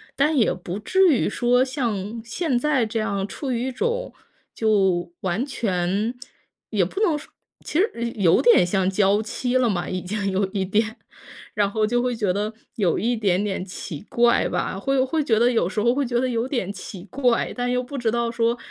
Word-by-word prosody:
但 295 +2 +2
也 225 - +3
不 180 +2 -6
至 375 - +3
于 255 - +1
说 245 +1 +2
像 230 -5 -3
现 260 +3 -1
在 270 -2 +2
这 225 0 -2
样 200 -2 -2
处 265 +6 -5
于 245 +1 -1
一 - - -2
种， 475 - -2 0.4
就 190 -6 +1
完 190 +7 -1
全 205 -3 -1 0.6
也 205 -4 +2
不 190 - -5
能 330 -8 +3
说 - - -12 0.3
其 310 - -1
实 410 - +2 0.2
有 180 -5 +4
点 470 - +6
像 185 +1 +1
娇 200 +1 +3
妻 245 +3 -3
了 250 -2 +2
嘛， 175 -4 -1
已 185 0 -3
经 200 +2 -2
有 195 +1 +1
一 190 0 -2
点。 220 +4 0 0.6
然 205 -2 +1
后 215 +1 +1
就 240 +3 +1
会 250 0 -1
觉 205 -5 0
得 210 +3 -2 0.2
有 195 -8 +1
一 240 +3 0
点 200 -3 +1
点 195 -3 -2
奇 180 -4 -7
怪 235 0 +3
吧， 190 - -2
会 270 +3 +1
会 305 +4 0
觉 225 -6 +2
得 240 +2 +4
有 225 -8 +1
时 210 - -3
候 240 +2 +3
会 280 0 0
觉 240 0 0
得 260 - +1
有 235 0 -1
点 240 -8 -2
奇 190 -3 -9
怪， 245 +3 0
但 245 0 -1
又 250 0 0
不 275 +3 -7
知 240 -3 0
道 235 +1 0
说 235 0 +1
225 Hz, 220 characters per minute, -23 LUFS, 195-250 Hz, 0.6 s, 点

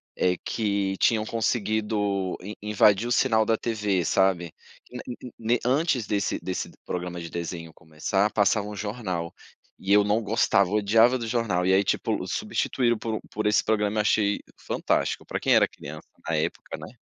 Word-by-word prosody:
eh, 90 -1 +1
que 100 -3 -1
tinham 110 -2 +2
conseguido 105 -4 -1
in 100 +4 -7
invadir 105 +1 +3
o 120 - -3
sinal 115 -3 +3
da 115 - +2
TV, 105 -7 -1
sabe. 90 -3 +1 0.4
In 125 - -7
ne 125 - -5
ne 125 - -9 0.2
ne - - -2
antes 130 -3 +1
desse 100 0 -1
desse 95 - -4 0.2
programa 90 -1 -4
de 85 -1 -7
desenho 85 -1 -5
começar, 80 +6 -1
passava 100 0 +2
um 105 - -7
jornal, 95 -5 -4 0.5
e 95 - -3
eu 105 - +6
não 105 +3 +1
gostava, 100 -3 +2
eu 105 - -1
odiava 115 +4 +4
do 115 - -5
jornal. 110 -6 0
E 95 - +3
aí, 95 - +4
tipo, - - -1
substituíram 120 -3 0
por 110 -1 -3
por 110 0 -1
esse 105 - +3
programa, 105 -1 0
e - - +5
achei 105 -1 +2 0.2
fantástico, - - -1
para - - -3
quem - - +3
era - - +5
criança - - -10 0.2
na 85 - 0
época, 75 - -3
né. - - -9
105 Hz, 180 wpm, -26 LUFS, 95-110 Hz, 0.5 s, eu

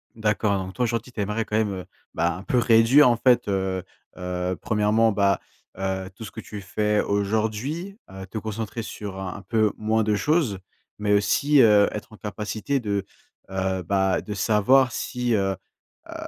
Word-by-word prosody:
D'accord, 105 -2 +1
donc 95 0 -6
toi, 125 - 0
aujourd'hui, 120 +1 -2
tu 110 - -9
aimerais 105 +3 -1
quand 110 - -2
même, 105 -2 +1
heu, 90 -1 -6 0.3
bah, 85 0 0
un 95 - -8
peu 125 - +1
réduire, 120 +5 +6
en 120 - +3
fait, 125 -3 +3
heu 95 -2 -1 0.3
heu, 90 0 -3
1°, 110 +1 +2
bah, 100 -1 +2 0.4
heu, 95 0 -3
tout 110 - -9
ce 105 - -7
que 115 - -9
tu 105 -2 -8
fais 105 +3 0
aujourd'hui, 110 - -2
heu, 95 0 -8
te 110 - -7
concentrer, 110 +1 -4
sur 100 -3 -7
un 95 -2 -4
un - - -10
peu 110 -1 +1
moins 110 +1 +1
de 105 0 +1
choses, 115 - +1 0.4
mais 105 0 +1
aussi, 135 +8 +4
heu, 105 -3 +6
être 105 +1 -7
en - - -12
capacité 110 +5 -3
de, 100 -4 -2 0.4
heu, 95 -1 -1
bah, 95 +1 +1
de 105 - -6
savoir 115 +6 +3
si, 125 +1 -2
heu 95 -2 +1 0.5
heu, - - -7
105 Hz, 185 wpm, -24 LUFS, 95-115 Hz, 0.5 s, réduire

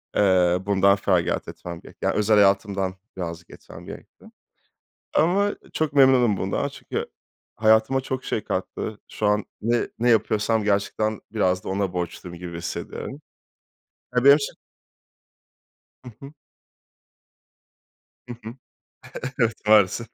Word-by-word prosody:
Eee, 90 -3 +4
bundan 100 0 +4
feragat 95 -3 0
etmem 85 -1 -8
gerekti. - - -10
Yani - - +1
özel 105 +1 +3
hayatımdan 100 -1 +2 0.2
birazcık 85 -1 -6
etmem - - -13
gerekti - - -12 0.9
ama 200 +5 +2 0.2
çok 155 -3 -1
memnunum 130 -6 +5
bundan - - -1
çünkü - - -5 0.5
hayatıma 110 +4 +3
çok 130 0 -4
şey 110 - -2
kattı. 100 +3 -4
Şu 105 - -2
an 105 0 +2 0.2
ne 120 +2 +1
ne 120 +2 +3
yapıyorsam 110 0 +2
gerçekten 105 +1 0
biraz 95 -4 +1
da - - -6
ona 95 -1 -1
borçluyum 85 0 -5
gibi 85 -1 -7
hissediyorum. 85 - -6 0.9
Ya 125 - +3
benim 140 0 +10
için 140 - -4 1.5
Hı 125 - -10
hı. 140 +1 -10 2.0
Hı 120 - -5
hı. 115 +2 -7 0.9
Evet, 115 -1 +2
maalesef. 105 +2 +4
105 Hz, 120 wpm, -24 LUFS, 95-115 Hz, 2.0 s, benim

